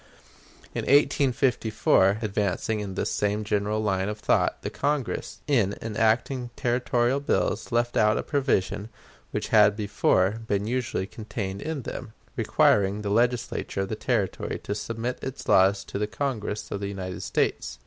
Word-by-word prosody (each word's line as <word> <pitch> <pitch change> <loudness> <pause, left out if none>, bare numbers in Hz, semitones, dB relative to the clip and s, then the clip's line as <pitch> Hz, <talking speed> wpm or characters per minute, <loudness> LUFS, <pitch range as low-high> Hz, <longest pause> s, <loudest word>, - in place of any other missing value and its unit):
In - - -2
1854, 125 -7 +3
advancing 105 +1 -1
in 100 -2 -5
this - - -1
same 105 +1 0
general 105 +1 0
line 95 -1 0
of 105 - -4
thought, 110 - +1
the - - -3
Congress, 145 -3 -2
in 115 -9 +2
enacting 115 +3 0
territorial 120 +1 +1
bills, 140 - -1
left 120 0 +1
out 105 0 +4
a - - -1
provision 120 -7 0 0.4
which - - -3
had 105 -1 +6
before 105 -1 +1
been 100 -1 0
usually 120 -4 -1
contained 100 -2 -5
in 155 -4 -4
them, 115 -1 -7 0.2
requiring 100 +1 +2
the 100 - -2
Legislature 120 -3 0
of 95 - -3
the - - -2
Territory - - -1
to - - -2
submit 115 +4 -4
its 130 0 -6
laws 95 +1 +4
to - - -5
the 105 - 0
Congress 115 -3 -3
of 100 - -2
the 100 - -3
United 95 -2 -5
States. - - -1
110 Hz, 150 wpm, -26 LUFS, 100-120 Hz, 0.4 s, had